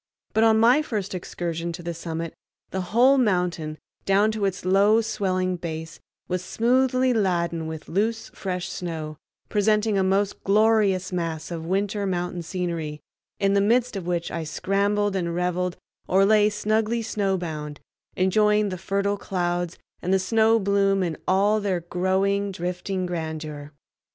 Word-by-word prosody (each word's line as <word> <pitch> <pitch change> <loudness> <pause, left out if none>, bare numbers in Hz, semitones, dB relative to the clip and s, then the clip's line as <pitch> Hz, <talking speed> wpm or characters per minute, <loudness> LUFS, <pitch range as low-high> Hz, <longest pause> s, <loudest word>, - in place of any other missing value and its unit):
But 220 - +3
on 220 -1 +5
my 245 +6 +5
first 210 -10 -3
excursion 170 -1 -4
to 175 - -8
the 170 0 -3
summit 165 0 -5 0.4
the 190 - -2
whole 245 +9 +4
mountain, 180 -8 0 0.3
down 200 +3 +3
to 215 -2 -1
its 190 -2 -2
low 200 +4 +5
swelling 185 -4 -1
base, 160 -1 -6 0.3
was 180 0 -2
smoothly 255 +4 +2
laden 170 -6 0
with 160 -1 -7
loose 220 +5 -1
fresh 180 -2 -3
snow, 160 -4 -5 0.3
presenting 210 0 +2
a - - +2
most 195 +1 0
glorious 205 -2 +3
mass 165 -2 -3
of 165 -1 -5
winter 200 +2 0
mountain 180 -1 -2
scenery, 165 -3 -3 0.4
in 195 0 +2
the 200 - +4
midst 240 +3 +2
of 185 -3 -5
which 170 -1 -1
I 165 - -3
scrambled 200 +5 0
and 170 -3 -1
reveled 180 0 -1 0.3
or 195 +1 +4
lay 210 0 +5
snugly 220 +2 0
snowbound, 175 -9 -2 0.4
enjoying 210 +2 +3
the 185 -2 -5
fertile 200 +2 0
clouds 175 -2 -2 0.2
and 180 - -2
the 190 - +5
snow 220 +4 +3
bloom 195 -1 +2
in 170 -3 -2
all 205 +3 +3
their 190 -4 -1
growing, 190 +3 0
drifting 180 +1 -3
grandeur. 155 -4 -5
190 Hz, 150 wpm, -24 LUFS, 175-210 Hz, 0.4 s, on